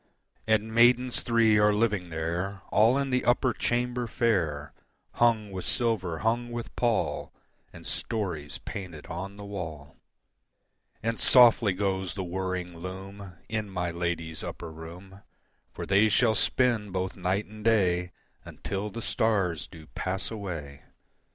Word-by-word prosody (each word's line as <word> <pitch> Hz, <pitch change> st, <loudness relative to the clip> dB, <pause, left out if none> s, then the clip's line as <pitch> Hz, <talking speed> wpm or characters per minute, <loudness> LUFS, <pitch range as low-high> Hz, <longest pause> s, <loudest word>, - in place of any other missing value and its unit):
And 110 Hz, 0 st, +2 dB
maidens 120 Hz, +2 st, +4 dB
three 115 Hz, -2 st, +4 dB
are 105 Hz, 0 st, +4 dB
living 105 Hz, -5 st, +1 dB
there 85 Hz, +5 st, -3 dB
All 115 Hz, +5 st, +5 dB
in 140 Hz, -1 st, -1 dB
the 125 Hz, 0 st, +2 dB
upper 125 Hz, 0 st, +3 dB
chamber 120 Hz, +1 st, -1 dB
fair, 85 Hz, -, 0 dB, 0.5 s
Hung 110 Hz, -4 st, +3 dB
with 95 Hz, -1 st, -5 dB
silver, 105 Hz, -9 st, 0 dB
hung 120 Hz, +2 st, +1 dB
with 120 Hz, -1 st, -6 dB
pall, 120 Hz, -3 st, 0 dB, 0.4 s
And -, -, -12 dB
stories 85 Hz, -9 st, -3 dB
painted 90 Hz, -8 st, -7 dB
on 95 Hz, +4 st, -6 dB
the 100 Hz, -, -8 dB
wall. 80 Hz, -8 st, -7 dB, 1.1 s
And 115 Hz, +1 st, -1 dB
softly 120 Hz, -5 st, +6 dB
goes 95 Hz, -1 st, -1 dB
the 95 Hz, -, -3 dB
whirring 90 Hz, -1 st, -3 dB
loom 95 Hz, +2 st, -8 dB
In 110 Hz, -2 st, -2 dB
my 90 Hz, -2 st, -2 dB
ladies' 85 Hz, -2 st, -3 dB
upper 85 Hz, -2 st, -6 dB
room, 90 Hz, +5 st, -11 dB, 0.5 s
For -, -, -6 dB
they 100 Hz, +3 st, +4 dB
shall 110 Hz, +2 st, +4 dB
spin 115 Hz, -1 st, +2 dB
both 95 Hz, 0 st, -2 dB
night 95 Hz, +3 st, 0 dB
and 105 Hz, +1 st, -12 dB
day 90 Hz, -5 st, +2 dB, 0.3 s
Until 100 Hz, +2 st, -4 dB
the 115 Hz, +3 st, -6 dB
stars 95 Hz, -7 st, +1 dB
do 80 Hz, -3 st, -13 dB
pass 95 Hz, +6 st, -4 dB
away. 85 Hz, -10 st, -6 dB
100 Hz, 140 wpm, -28 LUFS, 90-115 Hz, 1.1 s, softly